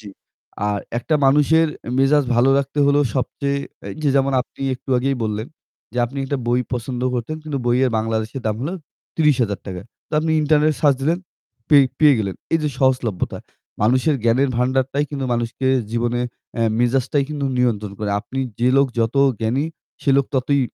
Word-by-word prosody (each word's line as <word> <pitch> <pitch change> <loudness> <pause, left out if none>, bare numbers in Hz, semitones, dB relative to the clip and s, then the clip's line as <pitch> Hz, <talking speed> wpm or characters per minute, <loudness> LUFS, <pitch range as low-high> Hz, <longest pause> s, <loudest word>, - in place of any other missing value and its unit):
জি, 105 - -11 0.6
আর 105 -1 0 0.2
একটা 155 +6 -1
মানুষের 150 +4 +4 0.3
মেজাজ 140 +1 +4
ভালো 125 +3 +4
রাখতে 140 +1 -3
হলো 140 +1 +4
সবচেয়ে 140 +2 -1 0.3
এই - - -6
যে, 145 - +2
যেমন 135 0 +2
আপনি - - -22
একটু 135 - -10
আগেই 135 +1 0
বললেন, 110 +2 -3 0.5
যে 125 - -4
আপনি 140 +3 -7
একটা 140 0 -2
বই 120 +1 +2
পছন্দ 125 +1 -3
করতেন। 125 +6 -3
কিন্তু 150 -3 -3
বইয়ের 125 +1 +3
বাংলাদেশের 110 +3 -2
দাম 105 0 0
হলো 165 +8 -3 0.4
৳৩০,০০০ 115 - 0 0.3
তো - - -33
আপনি 160 0 0
ইন্টারনেট 150 0 +3
সার্চ 145 -3 +4
দিলেন, 165 +5 +1 0.5
পে 150 - +6 0.2
পেয়ে 150 -2 +6
গেলেন। 100 -3 -2 0.2
এই 165 - +4
যে 150 - +1
সহজলভ্যতা। 125 -7 0 0.4
মানুষের 130 +7 +3
জ্ঞানের 130 +4 +3
ভান্ডারটাই 130 +3 +1
কিন্তু 140 -2 -3
মানুষকে 120 +3 -2 0.2
জীবনে 120 +1 -1 0.4
এ্যা 115 - +1
মেজাজটাই 130 +3 +1
কিন্তু 145 -2 -3
নিয়ন্ত্রণ 110 -5 0
করে। 105 -1 -2
আপনি 135 +4 -5 0.2
যে 125 - +4
লোক 140 - +5
যত 115 +2 +1 0.3
জ্ঞানী 120 +6 0 0.4
সে 140 - +2
লোক 140 - +2
ততই 135 +2 +2
130 Hz, 170 wpm, -21 LUFS, 120-140 Hz, 0.6 s, পে